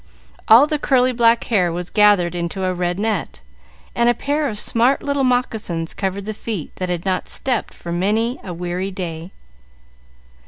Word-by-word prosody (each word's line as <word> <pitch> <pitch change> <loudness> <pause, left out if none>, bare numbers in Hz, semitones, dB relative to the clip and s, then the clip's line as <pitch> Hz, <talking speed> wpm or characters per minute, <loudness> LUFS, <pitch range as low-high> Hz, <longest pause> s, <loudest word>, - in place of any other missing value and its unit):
All 235 +6 +8
the 300 0 -2
curly 255 -2 +3
black 230 -1 +3
hair 185 -7 +1
was 175 +1 -5
gathered 205 -5 +4
into 175 +2 -3
a 185 0 0
red 175 0 -2
net, 205 - -2 0.5
and 235 0 +2
a 240 - +2
pair 290 +4 -1
of 210 - -6
smart 240 +6 +2
little 280 -1 0
moccasins 220 -10 -1
covered 195 0 -3
the 215 - -4
feet 215 -6 -6
that 185 -1 -3
had 175 0 -3
not 185 -1 -1
stepped 255 -3 -2
for 170 - -8
many 215 +8 0
a 185 - -6
weary 180 +2 -3
day. 175 -3 -6
200 Hz, 170 wpm, -20 LUFS, 180-235 Hz, 0.5 s, All